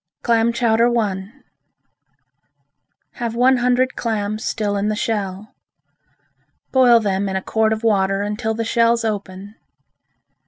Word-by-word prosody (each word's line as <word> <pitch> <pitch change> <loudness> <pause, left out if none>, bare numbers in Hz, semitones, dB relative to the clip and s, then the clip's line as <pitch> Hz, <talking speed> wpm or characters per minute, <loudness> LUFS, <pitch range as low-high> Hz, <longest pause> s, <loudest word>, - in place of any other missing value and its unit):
Clam 230 -1 +2
Chowder 235 0 +2
I 195 -2 -2 1.8
Have 235 -2 -5
one 255 +2 +4
hundred 250 +1 +1
clams 215 -2 -3
still 210 -2 -2
in 200 +1 -1
the 215 - -1
shell. 205 -2 -3 1.2
Boil 250 -3 +5
them 200 -2 -1
in 190 - -4
a 190 - -1
quart 220 0 +1
of 220 +1 -2
water 195 -2 +1
until 220 +2 -3
the 230 0 -3
shells 230 0 +2
open. 200 -1 -5
220 Hz, 125 wpm, -20 LUFS, 205-235 Hz, 1.8 s, Boil